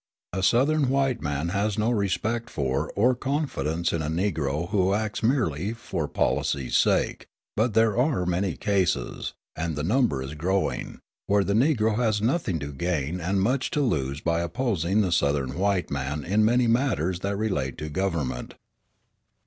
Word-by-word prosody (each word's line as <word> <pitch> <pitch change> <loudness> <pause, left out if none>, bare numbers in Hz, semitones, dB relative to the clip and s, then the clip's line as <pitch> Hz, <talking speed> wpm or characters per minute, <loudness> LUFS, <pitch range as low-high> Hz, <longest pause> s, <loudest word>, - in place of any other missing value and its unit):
A 95 - -1
Southern 135 +8 +3
white 135 -3 +1
man 75 +2 -2
has 100 +2 0
no 110 +2 +1
respect 110 +2 -1
for 65 -2 -1
or 120 +6 +4
confidence 120 - -1
in 85 - 0
a 75 - -2
Negro 80 -2 -1
who 95 -2 +2
acts 110 0 -2
merely 110 - +1
for 95 -9 -4
policy's 70 -3 0
sake; - - +2 0.3
but 110 0 +1
there 110 -2 +4
are 125 - +1
many 90 +1 0
cases 95 -11 0 0.2
and 80 -1 -2
the 75 - -3
number 110 - +1
is 70 +2 -6
growing 95 +6 -1 0.3
where 100 0 +3
the 100 - 0
Negro 110 -3 +2
has 110 -3 +1
nothing 115 - 0
to 75 -1 -6
gain 85 +2 -2
and 95 +3 +1
much 130 +5 +1
to 150 - 0
lose 70 - -1
by 85 0 +1
opposing 95 0 0
the 95 -4 0
Southern 70 -4 +1
white 95 -1 0
man 70 +1 -2
in 105 +4 +2
many 120 +3 +3
matters 115 - +1
that 100 +1 -2
relate 75 - -1
to 75 - -5
government. 80 -5 -2
95 Hz, 165 wpm, -26 LUFS, 80-115 Hz, 0.3 s, or